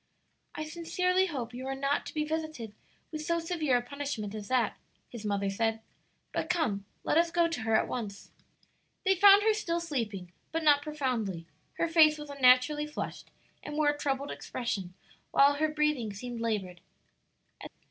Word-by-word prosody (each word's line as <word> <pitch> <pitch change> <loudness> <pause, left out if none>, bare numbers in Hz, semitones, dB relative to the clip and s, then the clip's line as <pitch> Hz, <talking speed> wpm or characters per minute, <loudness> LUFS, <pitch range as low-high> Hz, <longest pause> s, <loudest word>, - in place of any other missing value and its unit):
"I 310 - -3
sincerely 365 +3 0
hope 250 -8 -5
you 255 +2 -6
are 270 - -2
not 275 +1 -1
to - - -8
be 305 - +1
visited 310 -8 -4 0.4
with 310 -1 -4
so 335 +2 0
severe 325 -6 +1
a 240 - -3
punishment 245 -6 -4
as 210 -2 -6
that," 250 -4 +1 0.3
his 235 -3 -9
mother 200 -1 0
said. 225 +2 0 0.5
"But 320 - -2
come, 260 - 0 0.2
let 320 - +3
us 340 0 +3
go 340 0 +3
to 330 -7 -4
her 225 0 +1
at - - +3
once." 205 -5 -6 0.7
They 385 - +5
found 400 +2 +7
her 440 0 +4
still 345 -5 -1
sleeping, 225 - -4 0.2
but 325 +1 -1
not 290 -2 +5
profoundly; 250 - -2 0.3
her 335 - 0
face 315 -2 +5
was 295 -1 -8
unnaturally 275 +2 +4
flushed, 300 - -6 0.3
and 295 - -7
wore 305 -1 +3
a 290 - +1
troubled 275 0 -1
expression, 195 -7 -4 0.3
while 280 +1 +5
her 310 +1 +2
breathing 300 -7 0
seemed 235 +3 -6
labored. 195 -6 -2
280 Hz, 170 wpm, -30 LUFS, 225-315 Hz, 0.7 s, found